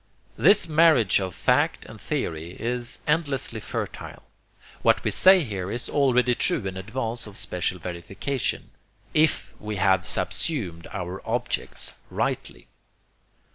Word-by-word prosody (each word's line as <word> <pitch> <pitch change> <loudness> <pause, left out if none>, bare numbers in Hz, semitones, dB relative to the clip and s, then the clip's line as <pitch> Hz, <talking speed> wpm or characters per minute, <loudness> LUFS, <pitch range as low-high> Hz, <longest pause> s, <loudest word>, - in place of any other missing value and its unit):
This 200 - +5
marriage 155 - +4
of 95 -3 -4
fact - - +1
and - - -12
theory 80 +2 -3
is 120 +1 -3
endlessly 145 -7 0
fertile. - - -6 0.6
What - - +3
we - - 0
say 190 0 +6
is - - -6
here 95 -2 -4 0.2
already 125 -3 +3
true 155 - 0
in 95 -1 -4
advance 115 +4 -3
of 105 - -8
special 90 +1 -2
verification, 90 +10 -3 0.4
IF 155 0 +2
WE 105 0 -4
HAVE 95 -2 +3
SUBSUMED 95 - -1
OUR 90 0 -5
OBJECTS 120 +2 -3 0.2
RIGHTLY. - - -3
110 Hz, 125 wpm, -25 LUFS, 95-140 Hz, 0.6 s, say